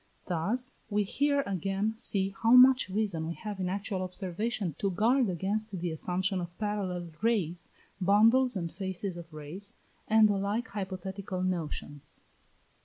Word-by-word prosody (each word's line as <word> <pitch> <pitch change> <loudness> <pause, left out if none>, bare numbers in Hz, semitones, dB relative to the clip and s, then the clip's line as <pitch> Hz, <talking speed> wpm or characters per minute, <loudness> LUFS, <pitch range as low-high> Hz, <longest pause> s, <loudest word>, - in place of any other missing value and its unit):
Thus 220 +10 0
we 210 -1 +2
here 285 +7 +1
again 195 +3 -1
see 195 -3 0
how 230 +1 +5
much 255 -4 +8
reason 190 -5 -1
we 170 - -3
have 210 -3 -6
in 185 -1 -1
actual 195 0 -2
observation 185 +1 -3
to 200 - +1
guard 230 +6 +3
against 195 +3 -2
the 175 0 -2
assumption 185 +4 -1
of 175 0 -7
parallel 190 -5 -2
rays, 195 -7 0 0.3
bundles 225 +6 +5
and 170 -3 -3
fasces 190 -1 -3
of 170 -1 -9
rays, 155 +7 -7 0.3
and 220 0 +6
the 205 -1 +1
like 210 +5 -1
hypothetical 190 -1 -4
notions. 155 -5 -4
195 Hz, 145 wpm, -30 LUFS, 180-215 Hz, 0.3 s, much